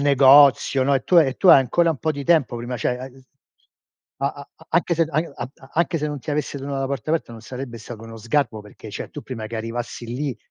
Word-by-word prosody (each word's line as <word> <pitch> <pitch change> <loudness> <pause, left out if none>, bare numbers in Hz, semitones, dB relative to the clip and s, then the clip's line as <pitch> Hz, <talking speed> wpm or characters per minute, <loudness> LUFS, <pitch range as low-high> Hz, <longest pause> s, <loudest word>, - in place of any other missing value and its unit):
negozio, 140 -1 +6
no, 140 +1 +2
e 135 - +2
tu 180 - +5
e 135 -5 +3
tu 190 - +2
hai - - +10
ancora 165 +6 +2
un 155 - -3
po' 160 - -1
di 140 -1 -6
tempo 145 -7 +2
prima, 120 +1 -5
cioè 125 +2 -1
hai 130 0 -11 1.0
a - - +3
a 140 -1 -12
a - - -19
anche 170 +1 +2
se 165 - +2
a 155 - +1 0.2
a - - -5 0.2
anche 170 0 +1
non 145 -1 -4
ti 155 - -6
avesse 145 -1 -2
tenuto 140 0 -4
la 135 - -1
porta 140 +1 -4
aperta 160 -7 -1
non 115 - -10
sarebbe 125 -1 -7
stato 115 0 -10
uno 115 0 -10
sgarbo, 115 0 -1
perché 105 +1 -12
cioè - - -7
tu 150 - -8
prima 115 -4 -6
che 115 +1 -6
arrivassi 115 +1 -5
lì, 130 +2 -3
135 Hz, 240 wpm, -22 LUFS, 120-145 Hz, 1.0 s, hai